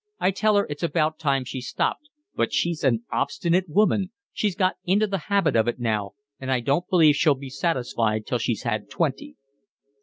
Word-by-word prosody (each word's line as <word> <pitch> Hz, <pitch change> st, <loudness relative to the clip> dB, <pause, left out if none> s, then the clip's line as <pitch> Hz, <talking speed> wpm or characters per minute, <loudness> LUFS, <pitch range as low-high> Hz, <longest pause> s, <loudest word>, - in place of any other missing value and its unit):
I 190 Hz, -, +2 dB
tell 215 Hz, +2 st, +2 dB
her 200 Hz, -, +3 dB
it's 145 Hz, -1 st, -6 dB
about 160 Hz, -2 st, 0 dB
time 140 Hz, -4 st, +1 dB
she 130 Hz, +1 st, -5 dB
stopped, 215 Hz, -, -2 dB, 0.2 s
but -, -, 0 dB
she's 170 Hz, -2 st, -1 dB
an 120 Hz, -4 st, +2 dB
obstinate 175 Hz, +1 st, 0 dB
woman, 200 Hz, +1 st, +2 dB, 0.2 s
she's 205 Hz, -4 st, -1 dB
got 185 Hz, 0 st, +1 dB
into 200 Hz, +4 st, +2 dB
the 195 Hz, -2 st, -2 dB
habit 195 Hz, -9 st, +2 dB
of 110 Hz, 0 st, +3 dB
it 120 Hz, -, -1 dB
now, 105 Hz, -4 st, -1 dB, 0.3 s
and 130 Hz, 0 st, -4 dB
I 130 Hz, -, +2 dB
don't 140 Hz, +9 st, 0 dB
believe 160 Hz, -5 st, +5 dB
she'll 145 Hz, 0 st, +3 dB
be 135 Hz, 0 st, -9 dB
satisfied 120 Hz, -7 st, -1 dB
till -, -, -1 dB
she's -, -, -2 dB
had -, -, -2 dB
twenty." 75 Hz, -, -2 dB
155 Hz, 190 wpm, -24 LUFS, 130-185 Hz, 0.3 s, believe